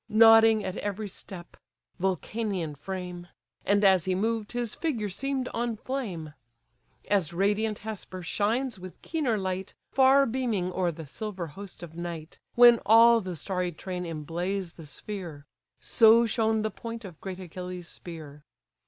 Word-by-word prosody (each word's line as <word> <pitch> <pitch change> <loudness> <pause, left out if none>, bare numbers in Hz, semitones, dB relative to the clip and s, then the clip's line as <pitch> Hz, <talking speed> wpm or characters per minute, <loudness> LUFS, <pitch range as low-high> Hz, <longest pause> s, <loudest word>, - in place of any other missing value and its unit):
Nodding 225 0 +7
at 185 - -4
every 205 +1 -3
step: 185 -2 -10 0.4
(Vulcanian 190 -2 -2
frame!) 180 +2 -6 0.4
And 205 0 +3
as 190 -4 +5
he 185 -1 +1
moved, 220 +2 -1
his 240 -2 -2
figure 235 -11 -2
seem'd 265 +5 -2
on 235 0 -2
flame. 200 - -4 0.7
As 185 -5 +1
radiant 205 +4 +1
Hesper 190 -4 -6
shines 220 +6 -1
with 185 0 -10
keener 285 -9 0
light, 190 0 -3 0.2
Far 270 +1 +5
beaming 225 -8 -1
o'er 180 -2 0
the 160 0 -9
silver 190 +4 -5
host 195 -2 -10
of 165 -1 -10
night, 170 -2 -7 0.2
When 240 -1 +8
all 230 +2 +7
the 185 -3 -5
starry 180 +2 -2
train 180 +2 -5
emblaze 170 +3 -3
the 160 -3 -12
sphere: 170 -4 -7 0.3
So 230 +1 +5
shone 220 -1 +1
the 215 - -1
point 230 +1 -7
of 175 -5 -11
great 190 -1 -6
Achilles' 180 0 -7
spear. 155 -5 -10
195 Hz, 145 wpm, -28 LUFS, 175-225 Hz, 0.7 s, When